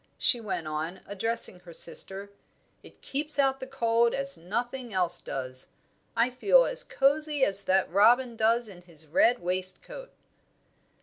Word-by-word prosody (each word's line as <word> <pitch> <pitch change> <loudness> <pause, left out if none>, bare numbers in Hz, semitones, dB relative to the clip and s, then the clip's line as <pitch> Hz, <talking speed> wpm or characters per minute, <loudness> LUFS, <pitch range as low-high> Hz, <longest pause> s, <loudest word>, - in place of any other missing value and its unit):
she 240 - +2
went 195 -6 -4
on, 155 +4 -4
addressing 205 -1 -1
her 180 -1 -14
sister. 195 +4 -1 0.5
"It - - -18
keeps 290 +2 -2
out 270 -1 +2
the 260 - -7
cold 235 -3 +1
as 275 0 +1
nothing 240 +8 -4
else 180 -3 0
does. 130 -1 -4 0.5
I 235 +2 +2
feel 405 - +4
as - - -2
cosy 290 - +2
as 200 0 +1
that 190 0 +2
robin 235 +6 +3
does 225 +2 +2
in 185 -4 -12
his 165 -3 -10
red 230 +10 +3
waistcoat." 185 - -4
230 Hz, 145 wpm, -28 LUFS, 185-265 Hz, 0.5 s, feel